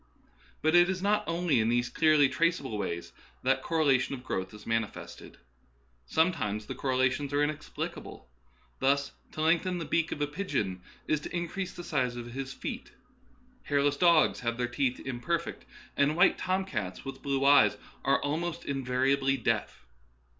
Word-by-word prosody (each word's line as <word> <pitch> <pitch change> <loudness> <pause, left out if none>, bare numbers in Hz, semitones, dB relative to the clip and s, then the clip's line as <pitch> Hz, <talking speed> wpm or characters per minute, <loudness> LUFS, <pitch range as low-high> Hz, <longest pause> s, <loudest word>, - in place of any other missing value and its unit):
But 155 +1 +3
it 175 +1 +6
is 185 0 -2
not 210 +1 +2
only 170 -6 +1
in 110 0 +2
these 120 +1 +2
clearly 155 +2 +4
traceable 160 -5 0
ways 85 -4 -4 0.3
that - - +2
correlation 140 -5 +2
of 125 - -11
growth 95 -7 -3
is 105 0 -12
manifested. 115 -2 -4 0.7
Sometimes 110 - 0
the - - -5
correla 130 -1 +1
tions 140 +1 -4
are 145 +1 +3
inexplicable. 150 0 -5 0.5
Thus, 140 +1 +2 0.2
to 155 - -4
lengthen 175 +3 +2
the 165 - -4
beak 165 +2 0
of - - -4
a 145 - +2
pigeon 145 - -3 0.2
is 155 - +1
to 155 - -7
increase 175 +2 -3
the 175 - -8
size 130 -8 -1
of 120 0 -7
his 135 0 -4
feet, - - -6 0.7
hairless 145 0 +2
dogs 170 0 +4
have 115 -1 -2
their 120 0 0
teeth 125 +1 -1
imperfect, 145 +7 -3 0.3
and 140 +2 +2
white 180 +1 +5
tomcats 170 - -2
with 135 0 -7
blue 135 -1 0
eyes 145 +1 +6 0.3
are 135 - +3
almost 165 +4 -2
invari 130 -1 0
ably 135 0 +1
deaf. - - -2
140 Hz, 160 wpm, -29 LUFS, 125-165 Hz, 0.7 s, it